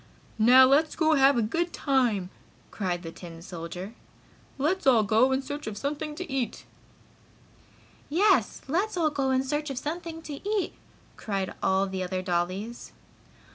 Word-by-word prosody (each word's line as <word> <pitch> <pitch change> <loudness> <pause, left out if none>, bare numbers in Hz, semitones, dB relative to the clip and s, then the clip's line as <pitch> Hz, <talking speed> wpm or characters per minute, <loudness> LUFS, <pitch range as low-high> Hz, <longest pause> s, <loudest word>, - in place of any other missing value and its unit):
"Now 250 +4 +8
let's 295 +4 +3
have 285 -4 +5
a 235 - +2
good 335 +11 -1
time!" 240 -10 0 0.4
cried 180 -3 -3
the 165 - -6
tin 165 -1 -10
soldier. 180 +3 -7 0.6
"Let's 310 +5 0
all 235 -5 +6
go 220 +6 +3
in 265 +1 0
search 290 0 -6
of 210 -1 -5
something 300 +4 -3
to 365 +3 -6
eat!" 265 -5 -3 1.4
"Yes! 380 +6 +2
Let's 365 +8 0
all 315 -3 +2
go 275 -2 0
in 260 0 +2
search 295 +3 -2
of 270 - -5
something 325 +3 -5
to 290 -3 -7
eat!" 420 -3 0 0.4
cried 195 -3 -3
all 190 +1 +2
the 190 -1 -4
other 185 0 -3
dollies. 185 +6 -3
265 Hz, 150 wpm, -27 LUFS, 195-300 Hz, 1.4 s, Now